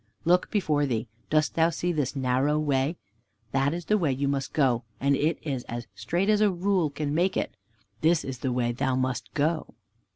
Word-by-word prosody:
Look 180 +2 +3
before 150 -8 +1
thee; 115 -2 -1 0.2
dost 155 -1 +2
thou 165 0 +3
see 175 +2 -1
this 145 -4 -1
narrow 135 +3 +1
way? 145 +1 +1 0.5
That 135 +2 +2
is 170 +1 -4
the 215 0 +2
way 145 -7 +1
thou 140 +2 -1
must 135 -1 -2
go, 125 -5 +2 0.2
and 140 +1 +3
it 155 +3 +1
is 135 -5 -2
as 120 0 -5
straight 180 +4 -1
as 210 0 +3
a 210 - +5
rule 180 -2 +1
can 145 0 -3
make 175 +4 +1
it. - - -2 0.5
This 160 +1 +3
is 130 -2 -5
the 130 - -1
way 120 -1 +1
thou 125 +2 0
must 130 -1 -2
go." 155 +2 0
145 Hz, 200 wpm, -27 LUFS, 130-170 Hz, 0.5 s, a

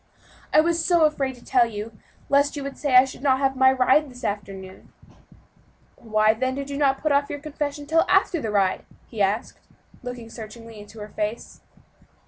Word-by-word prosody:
"I 305 - +6
was 335 0 0
so 345 -3 +3
afraid 275 -4 -1
to 245 - -18
tell 245 -2 +3
you, 215 0 -7 0.3
lest 285 +1 +2
you 285 - -5
would 275 0 -6
say 285 -4 -1
I 255 +1 +8
should 260 - -10
not 270 -2 +3
have 270 0 0
my 260 0 +5
ride 265 +3 +3
this 250 -1 -13
afternoon." 195 -3 -6 1.0
"Why, 215 -1 +2
then, 260 +3 -2
did 280 0 -5
you 280 - -4
not 275 -2 +2
put 305 - +1
off 280 0 +2
your 290 - -4
confession 290 0 -5
until 320 +3 +2
after 375 -4 +2
the 225 - -3
ride?" 200 -3 +1 0.2
he 220 -3 -6
asked, 200 +4 -1 0.4
looking 245 -2 -8
searchingly 225 0 -10
into 205 +2 -13
her 210 - -8
face. 210 +2 -5
260 Hz, 190 wpm, -24 LUFS, 220-285 Hz, 1.0 s, I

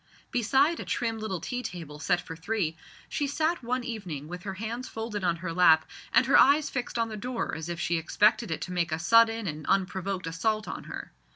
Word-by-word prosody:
Beside 270 +7 +3
a - - -4
trim 225 -2 -2
little 205 -5 -3
tea 245 +8 -3
table 160 -9 -7
set 180 +3 +2
for 170 -2 -8
three, 170 -1 -1 0.3
she 290 - -1
sat 320 +4 0
one 250 +1 -1
evening 180 - -5
with 180 +2 -7
her 195 -1 -5
hands 230 +5 -4
folded 225 -3 -4
on 175 -2 +2
her 170 0 -5
lap, 165 -3 +5 0.2
and - - +5
her 270 - +6
eyes 290 +2 +5
fixed 250 -2 -3
on 230 -1 +1
the 215 - -5
door 240 +3 -3
as 160 +1 -5
if 170 -1 -4
she 170 - +1
expected 215 +6 +2
it 160 - -3
to 180 - -4
make 170 -2 0
a 155 - 0
sudden 225 +5 +4
and 155 -3 -4
unprovoked 190 -1 0
assault 215 +7 -1
on - - -6
her. - - -7
205 Hz, 215 wpm, -28 LUFS, 170-235 Hz, 0.3 s, her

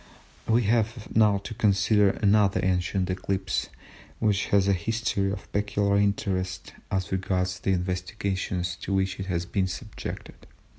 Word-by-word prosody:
We 115 +2 +3
have 110 +1 0
now 105 -2 +5
to 105 - -6
consider 105 -1 +3
another 100 -2 +3
ancient 95 0 0
eclipse 95 +1 -2 0.5
which 105 -3 +1
has 100 -2 +3
a 100 - +4
history 100 0 -1
of 100 0 -7
peculiar 100 0 +1
interest 95 -2 -1 0.2
as 95 -2 -2
regards 90 -1 -1
the 95 - +1
investigations 90 0 -2
to 95 - -3
which 95 0 0
it 95 - -4
has 85 -2 -1
been 95 +1 0
subjected. 105 +4 -7
100 Hz, 140 wpm, -26 LUFS, 95-105 Hz, 0.5 s, now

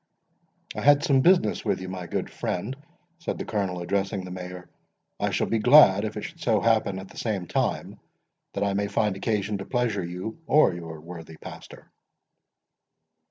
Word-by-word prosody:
"I - - -3
had 145 0 +5
some 140 -6 +4
business 180 +4 +3
with 100 -3 0
you, 95 - -6
my 90 -1 -6
good - - -2
friend," 105 +9 -3 0.4
said 170 - -3
the - - -5
Colonel, 95 -5 -2
addressing 100 +1 -1
the 90 - -8
Mayor; 90 -1 -7 0.5
"I - - +1
shall - - 0
be 115 - 0
glad 110 -5 +7
if 110 0 -5
it 105 - -4
should 170 0 -8
so 110 -7 +2
happen 110 -4 +2
at 95 0 -8
the - - -10
same 105 -6 -2
time, - - -2 0.5
that 100 - -1
I 100 -1 +1
may 100 +1 0
find 105 -1 0
occasion 100 0 -1
to 95 - -6
pleasure 120 -6 0
you 90 - -6
or 150 -10 +5
your 80 -2 -7
worthy 80 -1 -10
pastor." - - -11
100 Hz, 180 wpm, -26 LUFS, 90-115 Hz, 0.5 s, glad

